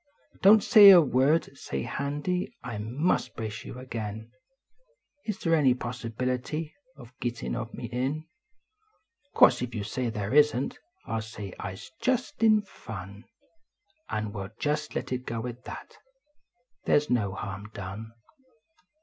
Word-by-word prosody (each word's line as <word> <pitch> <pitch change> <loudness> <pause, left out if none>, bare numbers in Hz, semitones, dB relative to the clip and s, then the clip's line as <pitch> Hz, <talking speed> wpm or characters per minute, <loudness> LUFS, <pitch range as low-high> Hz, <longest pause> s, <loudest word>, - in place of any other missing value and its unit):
Don 205 +3 +9
t 210 - -4
say 205 -2 +10
a 185 -2 +11
word! 140 +1 +2
Say, 70 - -4
Handy, 150 +6 -3
I 115 -5 -5
must 130 +12 0
brace 110 -1 -5
yon - - -8
agin: 110 -3 -6 0.9
Is 215 -3 -2
they 165 -1 +2
an} 135 -5 +4
possibility 125 +6 -3 0.2
Of 120 0 -13
gittin 120 -1 -3
of 120 -1 -4
me - - -6
in? 130 +7 -2 1.1
Course 125 - +6
if 125 -1 -4
you 105 - -2
say 120 +3 -2
they 110 +5 +2
isn 145 -3 +3
t, - - -18 0.3
I 115 -3 -2
ll - - -2
say 110 -3 -8
I 95 - -4
s 95 - -11
just 255 -3 0
in 215 -2 +5
fun, 100 - -9 0.8
And 110 -1 -3
we 100 - -4
ll 95 - -6
just 150 0 -1
let - - -3
it 125 0 -2
go 115 -1 -4
at 125 +1 -7
that - - -9 0.9
They - - +4
s 150 0 +2
no 105 -6 +1
harm 100 +1 -6
done. 100 +3 -7
125 Hz, 160 wpm, -28 LUFS, 110-150 Hz, 1.1 s, a